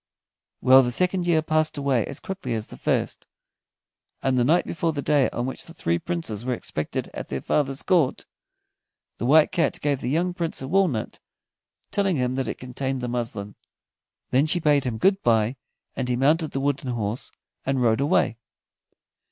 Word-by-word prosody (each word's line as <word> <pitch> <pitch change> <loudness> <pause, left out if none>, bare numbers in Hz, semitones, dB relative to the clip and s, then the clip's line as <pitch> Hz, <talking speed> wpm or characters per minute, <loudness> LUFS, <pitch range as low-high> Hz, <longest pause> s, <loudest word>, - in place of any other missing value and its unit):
Well, 130 +1 +8
the 125 - 0
second 180 +5 +2
year 160 -2 +3
passed 155 0 +1
away 135 -5 +1
as 140 - -5
quickly 145 -10 -4
as 110 -1 -3
the - - -11
first, - - -1 1.0
and 135 -1 +2
the 125 - +3
night 160 +8 +3
before 165 -1 -1
the 145 - -3
day 145 -3 +3
on 120 - -3
which 130 - -5
the 165 - -13
three 85 +1 0
Princes 165 - -4
were 125 0 -1
expected 75 -8 -4
at - - -6
their - - -2
father's 135 -2 0
court, 170 -8 +2 0.9
the 120 - -1
White 155 +2 +6
Cat 170 - 0
gave 145 -2 0
the 125 - -2
young 175 +5 +1
Prince 170 -2 -3
a 130 - -5
walnut, 170 - 0 0.7
telling 195 -3 +1
him 125 -2 0
that 135 0 -2
it - - -4
contained 130 +1 -4
the 125 - -2
muslin. 115 -4 -4 0.8
Then 135 +4 +3
she 175 +3 +2
bade 145 -4 +3
him 120 -3 -2
good 195 - +3
by, 115 +2 +2 0.4
and 125 -2 -2
he 125 - +1
mounted 150 +5 +2
the 135 - -3
wooden 140 -1 -1
horse 115 -1 -3 0.3
and 135 0 0
rode 115 0 +2
away. 140 -6 +2
135 Hz, 185 wpm, -24 LUFS, 125-160 Hz, 1.0 s, Well